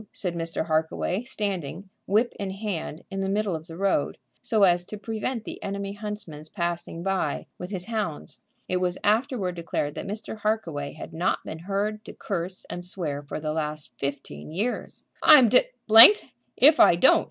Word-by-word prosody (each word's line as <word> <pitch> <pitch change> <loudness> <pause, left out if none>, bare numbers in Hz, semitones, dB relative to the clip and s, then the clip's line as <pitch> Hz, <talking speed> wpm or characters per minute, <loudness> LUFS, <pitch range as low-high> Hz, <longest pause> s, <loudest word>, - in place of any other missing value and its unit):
said 180 -3 -4
Mr. 165 -1 -3
Harkaway, 160 +4 -1
standing, 195 - -4 0.2
whip 220 +5 +2
in 200 -1 -3
hand, 190 -5 -5
in 195 - -4
the 195 0 -1
middle 200 -2 0
of 160 +1 -8
the 165 -1 -9
road, 195 -6 0 0.2
so 215 - +1
as 175 -2 +4
to 210 +4 -8
prevent 220 +3 -4
the - - -8
enemy's 200 0 -5
huntsman 210 -8 -6
passing 170 -2 -3
by 195 0 -1
with 180 - -6
his 185 -3 -3
hounds. 215 -9 -4 0.3
It 185 - 0
was 180 0 0
afterward 215 -3 +1
declared 165 -4 -3
that - - -6
Mr. 215 +1 -6
Harkaway 165 -10 -2
had 155 - -10
not 170 +3 -1
been 160 - -7
heard 205 +4 -2
to - - -9
curse 185 -2 -5
and 175 - -6
swear 165 -6 -3
for 145 - -6
the 155 0 -3
last 150 -3 -4
fifteen 140 +2 -5
years. 210 +9 -3 0.2
"I'm 275 -7 +8
d 255 - +5 0.2
d 225 - +11 0.4
if 300 +3 +7
I - - +7
don't!" 175 - +5
190 Hz, 175 wpm, -25 LUFS, 165-210 Hz, 0.4 s, d